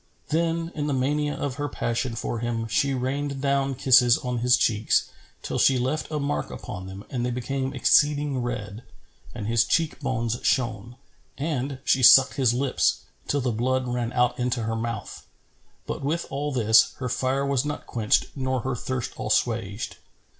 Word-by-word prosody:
Then, 165 +1 0
in 150 -2 -3
the 145 - 0
mania 145 +3 0
of 140 -2 -4
her 145 0 -2
passion 120 0 -2
for 115 0 -3
him, 115 -1 -2
she 135 +4 +1
rained 140 +2 -2
down 140 0 0
kisses 125 -2 +5
on 125 -1 -3
his 125 +1 +4
cheeks, 110 -2 +1 0.3
till - - -3
she 135 - +4
left 130 +5 -2
a 155 - -2
mark 145 +1 -2
upon 95 +1 -7
them 95 +1 -9
and 125 -2 -2
they 125 - 0
became 130 +2 -3
exceeding 145 +2 +3
red 110 -3 -5 0.5
and 105 - -5
his 115 +1 +3
cheek 165 +3 0
bones 120 -2 -2
shone; 115 -2 -1 0.4
and, 140 -2 -2
she 135 - +3
sucked 135 +2 +8
his 130 -4 +2
lips, 130 +2 +1 0.3
till 145 - 0
the 125 -1 0
blood 130 +3 0
ran 120 -1 -2
out 125 0 +1
into 125 -1 -1
her 115 +1 -2
mouth; 115 -2 -5 0.6
but - - -4
with 155 +5 -1
all 145 +2 -2
this, 110 -4 +4
her 130 - -4
fire 130 +3 0
was 140 -2 +1
not 150 0 -5
quenched 110 -3 +1
nor 130 -2 -1
her 130 +1 -2
thirst 125 +1 -3
assuaged. 110 -3 -1
130 Hz, 175 wpm, -25 LUFS, 120-140 Hz, 0.6 s, sucked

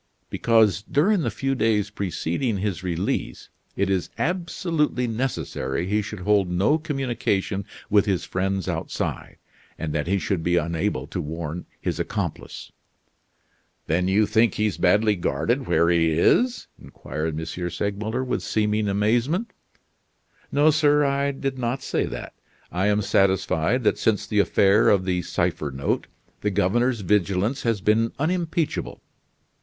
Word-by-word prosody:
"Because, 110 -6 +3
during 170 - +2
the - - 0
few 135 0 -2
days 110 -4 +1
preceding 100 - -2
his 95 -2 -2
release, 90 0 -3 0.3
it 100 - +1
is 95 -2 0
absolutely 165 -5 -1
necessary 90 - -2
he 105 +3 +1
should 105 -1 -7
hold 100 -1 +2
no 100 - +2
communication 120 - -1 0.2
with 105 0 +3
his 95 -3 0
friends 95 0 -2
outside, - - -4 0.4
and 80 -2 -4
that 75 0 -1
he 100 +2 +2
should 95 -2 -1
be 85 +1 +1
unable 85 -3 -1
to 85 +4 -4
warn 80 +2 -5
his - - -3
accomplice." - - -4 1.1
"Then 90 +3 +1
you 100 +3 +3
think 110 0 +2
he's 105 -2 0
badly 105 +3 +3
guarded 85 - -1
where 85 +1 +3
he 85 -1 +3
is?" 245 - +2 0.2
inquired 80 0 -5
M. 80 - -4
Segmuller 100 +7 -3
with 130 - -2
seeming 105 0 0
amazement. 120 - +1 1.0
"No, 150 +2 +4
sir, 150 -1 +3
I 140 0 +1
did 135 -1 -3
not 125 +2 -2
say - - -1
that. - - -7 0.4
I 90 +4 0
am 105 0 +2
satisfied 95 +2 +2
that - - +2
since 110 -2 +1
the 105 - 0
affair 100 +1 +4
of 95 -2 +3
the 90 -1 0
cipher 85 -3 -1
note 70 0 -2 0.3
the 105 - +1
governor's 105 +5 +1
vigilance 100 +6 +1
has 115 -4 0
been 110 +3 +2
unimpeachable. 165 +1 -2
105 Hz, 140 wpm, -24 LUFS, 90-125 Hz, 1.1 s, No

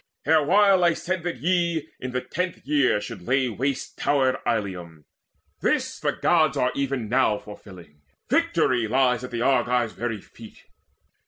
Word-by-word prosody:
Erewhile 180 +5 +4
I 170 -1 +4
said 185 0 -3
that 175 -6 -3
ye 170 -1 0
in 130 - -5
the 125 0 -2
tenth 175 +7 -4
year 140 -6 +2
Should 110 -2 -8
lay 130 +6 +1
waste 135 +4 -3
towered 135 -3 +2
Ilium: 90 -8 -3 0.5
this - - -1
the - - 0
Gods 155 -4 +2
Are 125 -1 +1
even 135 -4 -2
now 120 -2 +2
fulfilling; 90 -8 -13 0.3
victory 120 -3 +1
lies 125 0 +2
At 125 - -6
the 120 -1 -3
Argives' 125 -3 +1
very 115 -3 -4
feet. 110 +2 -15
130 Hz, 150 wpm, -24 LUFS, 115-150 Hz, 0.5 s, Erewhile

